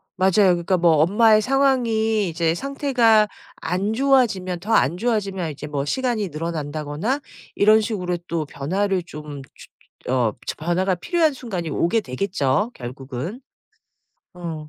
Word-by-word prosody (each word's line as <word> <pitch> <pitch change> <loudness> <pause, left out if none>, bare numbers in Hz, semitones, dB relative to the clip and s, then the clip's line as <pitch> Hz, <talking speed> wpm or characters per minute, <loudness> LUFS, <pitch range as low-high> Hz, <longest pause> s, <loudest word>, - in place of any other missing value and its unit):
맞아요. 190 0 +2 0.2
그러니까 175 +2 0
뭐 170 -1 +4
엄마의 215 +7 +5
상황이 230 -6 +1
이제 165 0 0
상태가 245 -4 +2 0.3
안 185 +6 -2
좋아지면 225 -9 +2
더 225 +2 -2
안 165 -1 +3
좋아지면 195 -6 -1
이제 150 +1 -8
뭐 145 -1 -3
시간이 235 - -1
늘어난다거나 155 - -3 0.4
이런 215 +2 +5
식으로 180 -5 -2
또 165 -2 -2
변화를 185 +7 -1
좀 150 -4 -9
주 130 - -16 0.4
주 - - -1
어 120 -4 +2
츠 - - -2
어 155 - -9
변화가 185 +2 +1
필요한 320 - +1
순간이 200 -11 -5
오게 175 +9 +1
되겠죠 185 - -1
결국은. 130 - -7 0.9
어 165 -4 -6
185 Hz, 305 characters per minute, -22 LUFS, 155-220 Hz, 0.9 s, 엄마의